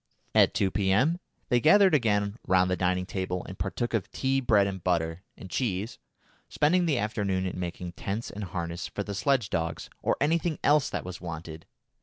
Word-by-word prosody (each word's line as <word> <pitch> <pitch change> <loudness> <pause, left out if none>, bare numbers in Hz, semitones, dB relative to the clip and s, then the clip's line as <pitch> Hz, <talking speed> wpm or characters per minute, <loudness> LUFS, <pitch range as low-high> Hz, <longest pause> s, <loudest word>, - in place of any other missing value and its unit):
At - - +5
2 100 -3 +1
P.M. 105 - +2 0.3
they 125 - +4
gathered 190 +6 +6
again 105 -5 +1
round 90 0 +3
the - - +2
dining 90 0 0
table 90 -1 -3
and 95 - -9
partook 100 +6 -2
of 110 -5 -1
tea, 135 0 0
bread 105 -5 +4
and 95 -3 -4
butter, 85 -1 0 0.2
and - - -9
cheese, 105 -1 -2 0.5
spending 175 +4 +2
the 145 -5 +2
afternoon 100 -4 -1
in 90 -1 -4
making 90 0 -4
tents 100 +6 -4
and 105 0 -5
harness 85 -1 -4
for 100 - -4
the 100 - -5
sledge 120 +2 +1
dogs, 80 -1 -3
or - - +1
anything 160 +2 +1
else 145 -2 +4
that - - -4
was 90 -1 -7
wanted. 80 -2 -7
100 Hz, 185 wpm, -28 LUFS, 90-125 Hz, 0.5 s, gathered